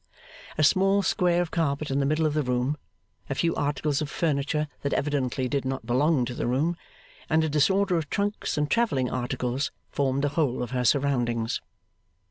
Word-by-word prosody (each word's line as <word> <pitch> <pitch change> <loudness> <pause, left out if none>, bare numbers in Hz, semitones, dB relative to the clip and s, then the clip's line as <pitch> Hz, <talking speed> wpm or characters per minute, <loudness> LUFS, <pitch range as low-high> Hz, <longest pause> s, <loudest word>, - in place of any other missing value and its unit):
A 155 - +2
small 195 +5 +4
square 175 -1 +2
of 170 - -8
carpet 150 -3 -1
in 135 - +1
the 140 - +1
middle 155 +2 +1
of 150 - +1
the 155 - +1
room, 125 +2 0 0.5
a 135 - -1
few 165 +4 +1
articles 145 0 -1
of 150 - -3
furniture 150 -1 0
that 140 - -1
evidently 135 -3 0
did 140 +1 -1
not 130 0 -3
belong 130 +2 +2
to 120 - -5
the 120 - -2
room, 145 +8 +1 0.5
and 160 0 +3
a 160 - 0
disorder 185 +5 +2
of 155 -3 -3
trunks 205 -4 -1
and 150 0 +1
travelling 145 - +1
articles, 125 +3 -2 0.2
formed 140 0 0
the 145 - +2
whole 140 -5 0
of 120 - -6
her 125 -1 -1
surroundings. 120 -5 +1
145 Hz, 185 wpm, -26 LUFS, 130-160 Hz, 0.5 s, small